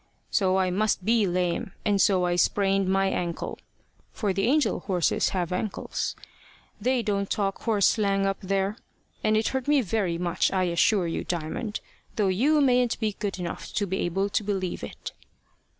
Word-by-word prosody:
So 190 -4 +2
I 185 -1 +1
must 200 -1 0
be 225 -2 +3
lame, 180 0 -1
and 205 -2 +3
so 185 -3 +3
I 175 0 +1
sprained 195 +1 +2
my 195 0 +2
ankle 170 -3 -3 0.5
for 205 -5 -1
the 195 +1 0
angel 295 +3 +2
horses 180 -4 +1
have 180 -3 -2
ankles 200 +3 -3 0.7
they 250 +1 +1
don't 200 -2 -1
talk 195 -3 -1
horse 210 -4 +2
slang 200 -2 +2
up 195 0 -1
there 195 +2 -1 0.5
and 215 0 +3
it 220 - +1
hurt 265 0 -3
me 295 -1 +4
very 195 -5 -1
much, 175 0 0
I 190 -1 +1
assure 180 +2 +2
you, 165 - -2
Diamond, 175 +6 -3 0.3
though 205 -3 +2
you 285 +11 +3
mayn't 250 -3 +3
be 215 -3 -1
good 205 -3 -2
enough 175 -2 -5
to 205 - 0
be 190 0 -2
able 195 +3 0
to 205 +1 0
believe 190 - -2
it." 70 - -7
195 Hz, 175 wpm, -26 LUFS, 185-215 Hz, 0.7 s, me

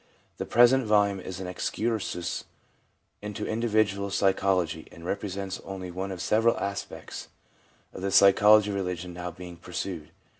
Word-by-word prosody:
The - - -4
present 120 +3 +5
volume 100 -2 +3
is 95 0 -7
an 95 - -5
excursus 95 0 -2 0.8
into 105 -1 -5
individual 110 -3 +1
psychology, 95 -4 +1
and 85 - -12
represents 95 0 -4
only 95 -2 -6
one 95 +2 -4
of 95 -1 -5
several 115 +4 +3
aspects 100 0 -5 0.7
of - - -8
the 100 - -1
psychology 105 +2 +6
of - - -3
religion 90 -2 -3
now 90 0 -5
being 90 0 -10
pursued. 85 -4 -5
95 Hz, 140 wpm, -27 LUFS, 90-105 Hz, 0.8 s, psychology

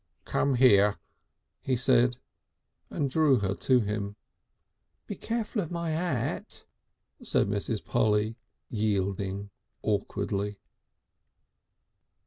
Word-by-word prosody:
"Come 140 -2 +1
here," 105 -5 +5 0.6
he 130 - 0
said, 125 -1 +3 0.7
and 145 - -1
drew 140 -1 +4
her 95 -1 0
to 125 +4 +3
him. 105 -1 -3 0.9
"Be - - -5
careful 225 -1 -2
of 165 - -5
my 170 -1 -2
'at," 155 -7 -2 0.6
said - - +1
Mrs. 105 +2 -2
Polly, 110 +1 +1 0.4
yielding 100 -2 -1 0.3
awkwardly. 100 -1 -1
110 Hz, 95 wpm, -28 LUFS, 100-135 Hz, 0.9 s, here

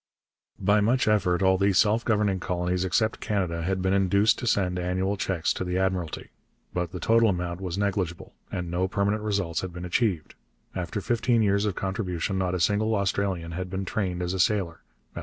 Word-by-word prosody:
By 105 +1 +3
much 120 +4 +2
effort 95 -4 +2
all 95 0 +4
the 100 0 +3
self 110 +5 +3
governing 105 -4 +1
colonies 90 0 -1
except 110 +5 +1
Canada 90 -6 -1
had 95 +2 -1
been 95 0 +2
induced 100 +2 +3
to 120 - -4
send 90 -4 +1
annual 95 +3 -1
cheques 90 -4 -1
to - - -3
the 90 0 -2
Admiralty. 95 -3 -2 0.4
But 90 -1 -2
the 90 - -6
total 115 +2 +4
amount 90 -1 -2
was 90 -1 -3
negligible, 95 -4 -2 0.2
and 90 -2 -4
no 90 +2 0
permanent 100 +2 0
results 100 -6 -1
had 95 - -5
been 90 +1 -7
achieved. 90 -3 0 0.4
After - - -3
fifteen 120 -1 +1
years 100 0 +2
of 100 -2 -1
contribution 95 -2 -2
not 90 -1 0
a - - -2
single 105 +5 +2
Australian 95 -4 -1
had 90 +2 -4
been 95 +1 -3
trained 90 -3 -2
as 90 +1 -2
a 95 - -3
sailor. 90 -4 +1
95 Hz, 190 wpm, -26 LUFS, 90-105 Hz, 0.4 s, all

